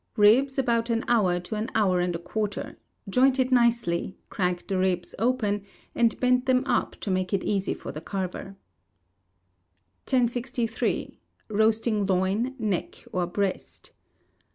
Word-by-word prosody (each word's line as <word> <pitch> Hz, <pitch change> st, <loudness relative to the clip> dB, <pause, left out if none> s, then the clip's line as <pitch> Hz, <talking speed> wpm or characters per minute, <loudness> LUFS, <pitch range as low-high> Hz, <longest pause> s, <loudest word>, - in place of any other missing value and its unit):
Ribs, 250 Hz, +7 st, +5 dB
about 235 Hz, -3 st, +1 dB
an 230 Hz, 0 st, 0 dB
hour 190 Hz, -7 st, +3 dB
to 180 Hz, -, -7 dB
an 215 Hz, +3 st, -2 dB
hour 190 Hz, -5 st, +3 dB
and 175 Hz, -1 st, 0 dB
a -, -, 0 dB
quarter; 205 Hz, +4 st, -4 dB, 0.3 s
joint 255 Hz, +6 st, +3 dB
it 260 Hz, 0 st, +1 dB
nicely; 235 Hz, -8 st, +2 dB
crack 180 Hz, -2 st, -1 dB
the 190 Hz, -1 st, -1 dB
ribs 185 Hz, -1 st, 0 dB
across, 225 Hz, -3 st, +1 dB, 0.3 s
and 235 Hz, -1 st, +2 dB
bend 250 Hz, 0 st, +2 dB
them 255 Hz, 0 st, +3 dB
up 250 Hz, -3 st, 0 dB
to 200 Hz, -, -2 dB
make 185 Hz, +1 st, -1 dB
it 195 Hz, -, +1 dB
easy 200 Hz, -2 st, 0 dB
for -, -, -7 dB
the 155 Hz, -, -7 dB
carver. 190 Hz, +1 st, -5 dB, 1.5 s
1063. 245 Hz, -2 st, -1 dB, 0.3 s
Roasting 215 Hz, -1 st, +2 dB
Loin, 195 Hz, +7 st, 0 dB
Neck 210 Hz, -6 st, -3 dB
or 180 Hz, -1 st, -1 dB
Breast. 190 Hz, +1 st, -3 dB
215 Hz, 140 wpm, -26 LUFS, 185-240 Hz, 1.5 s, Ribs